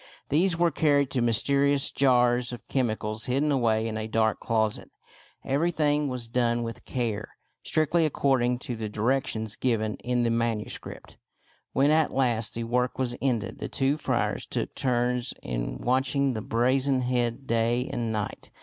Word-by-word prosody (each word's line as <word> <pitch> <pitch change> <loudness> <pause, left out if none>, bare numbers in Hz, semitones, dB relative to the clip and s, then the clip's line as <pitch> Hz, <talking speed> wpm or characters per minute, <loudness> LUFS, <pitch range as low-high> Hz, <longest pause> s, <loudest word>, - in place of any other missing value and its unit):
These 170 +4 +2
were 170 0 +3
carried 140 -4 +2
to 125 - 0
mysterious 140 +4 +2
jars 125 -2 +3
of 120 - -9
chemicals 110 -4 -1
hidden 140 +4 +1
away 115 -4 +2
in 110 -1 -3
a 110 0 -3
dark 110 -1 +1
closet. 110 -2 -1 0.6
Every 145 +6 +1
thing 150 -3 +1
was 125 -3 -4
done 120 0 +1
with 115 -1 -7
care, 115 -4 -3 0.3
strictly 155 +2 +1
according 130 -5 +2
to 120 - -3
the 110 -1 -4
directions 110 -1 -1
given 110 -4 0
in 125 0 -1
the 115 - +1
manuscript. 115 -2 -3 0.6
When 140 +2 +3
at 155 0 +3
last 120 -5 0
the 115 - -2
work 125 +2 0
was 125 -2 -1
ended, 120 -5 -1
the - - -4
two 135 +1 +1
friars - - -1
took - - -3
turns 125 -1 0
in - - -3
watching 130 - +1
the 110 - -3
brazen 130 +4 +1
head 125 +1 -1
day 115 +2 +1
and 115 -2 -2
night. 105 -2 -4
125 Hz, 160 wpm, -27 LUFS, 115-135 Hz, 0.6 s, were